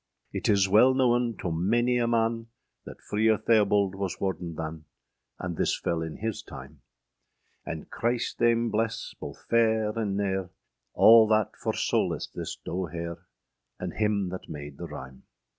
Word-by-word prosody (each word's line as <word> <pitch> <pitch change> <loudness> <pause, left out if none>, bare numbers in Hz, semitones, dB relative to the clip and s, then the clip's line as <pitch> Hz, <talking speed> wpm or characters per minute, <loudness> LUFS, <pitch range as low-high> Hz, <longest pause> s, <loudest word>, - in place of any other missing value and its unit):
Yt - - -2
is 100 -2 +4
wel 115 +7 +5
knowen 120 -3 +2
toe 85 - -3
manie 120 +9 +1
a - - +1
man, 115 0 0 0.4
That - - -11
Freer 110 +1 +2
Theobald 105 -3 +3
was 95 -1 -4
warden 90 -3 -3
than, 80 0 -6 0.5
And 90 -1 -4
thys - - 0
fel 85 -1 -1
in 80 -1 -5
hys 110 -2 -2
tyme. 70 +2 -11 0.9
And 80 -2 -5
Chryst 120 +2 -1
thayme 115 -1 +3
bles 110 +1 -2
both - - -9
ferre 110 -2 +2
and 100 -3 -1
nere, 95 -2 -1 0.5
Al 115 0 +8
that 110 -2 +1
for - - -2
solas - - -1
this - - -5
doe 90 +1 -2
here, 85 +1 -6 0.5
And - - -4
hym 105 -3 0
that 90 +1 -8
made 75 -2 -8
the - - -5
ryme. 65 0 -9
100 Hz, 160 wpm, -27 LUFS, 85-115 Hz, 0.9 s, Al